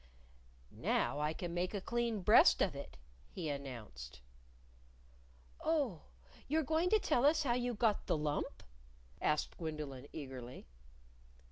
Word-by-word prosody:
"Now 135 +5 0
I 150 +1 +1
can 170 +1 -5
make 180 +3 -1
a - - 0
clean 235 0 -1
breast 210 +5 +7
of 175 -8 -1
it," 140 - -8 0.3
he 170 -5 -4
announced. 115 - -7 1.4
"Oh, 280 - 0 0.4
you're 315 +3 +2
going 320 +5 +1
to 435 - +6
tell 250 - +1
us 310 +2 +5
how 245 -4 +2
you 245 0 -1
got 215 -1 +1
the - - +2
lump?" 150 -1 -2 0.6
asked 150 0 0
Gwendolyn, 150 -5 -5
eagerly. 130 -4 -7
170 Hz, 130 wpm, -36 LUFS, -, 1.4 s, breast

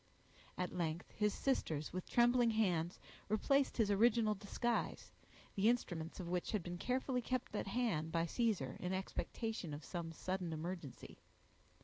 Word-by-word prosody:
At 180 0 -2
length 170 -1 -2
his 210 -1 +1
sisters, 160 - -1
with 185 0 -4
trembling 240 0 +5
hands, 180 -6 +1 0.3
replaced 275 +6 +2
his 215 -4 +3
original 220 +1 +4
disguise, 215 +4 -2 0.4
the 205 +3 +4
instruments 175 -9 -1
of 180 - -4
which 180 +3 -1
had 205 -5 0
been 175 0 -5
carefully 255 +2 0
kept 255 -1 -2
at 205 - -2
hand 195 -8 0
by 165 0 +2
Caesar, 190 - 0
in 180 +1 -2
expectation 190 -2 -3
of 145 - -9
some 170 -2 -4
sudden 180 +1 -3
emergency. 165 -3 -6
195 Hz, 145 wpm, -38 LUFS, 170-230 Hz, 0.4 s, trembling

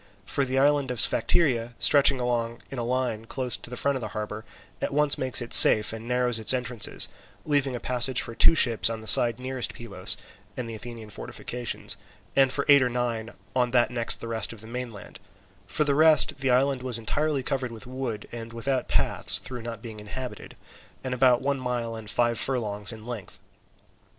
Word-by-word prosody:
For 140 - -2
the 130 0 -3
island 140 0 +1
of 125 -2 -4
Sphacteria, 120 -3 +3
stretching 140 -2 +4
along 120 -1 -3
in 135 - -6
a - - -3
line 120 -2 -3
close 125 +1 -1
in 125 - -9
front 140 +3 -1
of 130 - -5
the 110 - -5
harbour, 105 0 -6 0.4
at - - -4
once 150 -1 +3
makes 130 -1 -1
it 120 - -5
safe 105 0 +10
and 115 +1 -9
narrows 125 -2 -1
its 110 +4 +2
entrances, 125 -3 -2 0.4
leaving 140 -3 0
a - - -5
passage 125 +1 0
for 115 - -4
two 165 - +4
ships 115 -7 +2
on 115 -1 -6
the - - -13
side 120 +2 +8
nearest 130 -1 -4
Pylos 115 -3 -2 0.4
and 125 -2 -5
the 115 - -8
Athenian 110 -1 -10
fortifications, 120 +3 -4 0.4
and 135 -1 +3
for 140 +1 -3
eight 140 -1 +6
or 125 - 0
nine 120 -2 -4 0.2
on 125 -1 +1
that 120 0 +1
next 120 -1 -1
the 115 - -7
rest 115 -1 -2
of 115 -3 -12
the - - -13
mainland: 120 -3 -9 0.5
for 150 - -1
the 145 -1 0
rest, 155 -1 +3
the 135 -1 -2
island 130 +1 +1
was 125 -2 -3
entirely 140 +5 -2
covered 130 -2 -3
with 110 -2 -10
wood, 125 -4 -6
and 115 -1 -9
without 130 +3 -3
paths - - +2
through 125 -2 -9
not 115 -1 -8
being 110 -3 -9
inhabited, 125 +5 -9 0.5
and 130 -1 -4
about 125 0 +2
one 140 0 -2
mile 120 -2 -4
and 110 -2 -10
five 120 0 -1
furlongs 105 -6 -1
in 110 -1 -11
length. 120 -5 -8
125 Hz, 195 wpm, -25 LUFS, 115-130 Hz, 0.5 s, safe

